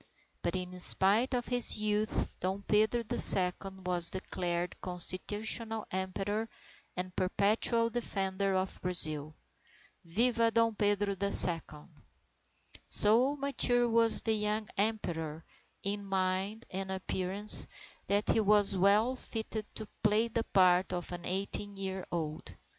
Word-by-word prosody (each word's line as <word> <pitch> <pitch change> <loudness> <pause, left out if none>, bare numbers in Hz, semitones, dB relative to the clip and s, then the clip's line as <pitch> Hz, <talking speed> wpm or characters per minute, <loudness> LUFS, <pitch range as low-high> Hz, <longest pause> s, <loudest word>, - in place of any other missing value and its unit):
But - - -4
in 180 0 -8
spite 210 +8 +4
of 245 -1 -5
his 245 -2 +2
youth, 210 0 -4
Dom 190 +2 -6
Pedro 215 +4 -1
the 215 - -4
Second 190 0 +2
was 175 -2 +2
declared 175 -2 -6
constitutional 210 +5 -5
Emperor 195 +4 -5 0.5
and 180 0 -8
perpetual 220 +5 -2
defender 195 -4 -4
of 185 0 -5
Brazil. 155 -4 -1 0.7
Viva 230 +6 -1
Dom 230 0 -1
Pedro 205 -1 -2
the 200 +1 -5
Second! 160 -3 +6 1.0
So 240 +7 +4
mature 260 -4 -2
was 230 0 +4
the 225 - -1
young 210 0 -3
Emperor 165 -7 -5 0.4
in 205 +1 -4
mind 195 +3 -5
and 190 0 -7
appearance, 190 +2 +8 0.4
that 205 +1 -2
he - - 0
was 205 -1 0
well 205 +7 0
fitted 220 -3 -6
to 220 - -9
play 215 +2 -1
the 225 0 -5
part 185 -1 0
of 175 -1 -7
an 175 -1 -10
eighteen 200 +2 -4
year 190 -1 -7
old. 155 -3 -8
200 Hz, 125 wpm, -28 LUFS, 185-220 Hz, 1.0 s, appearance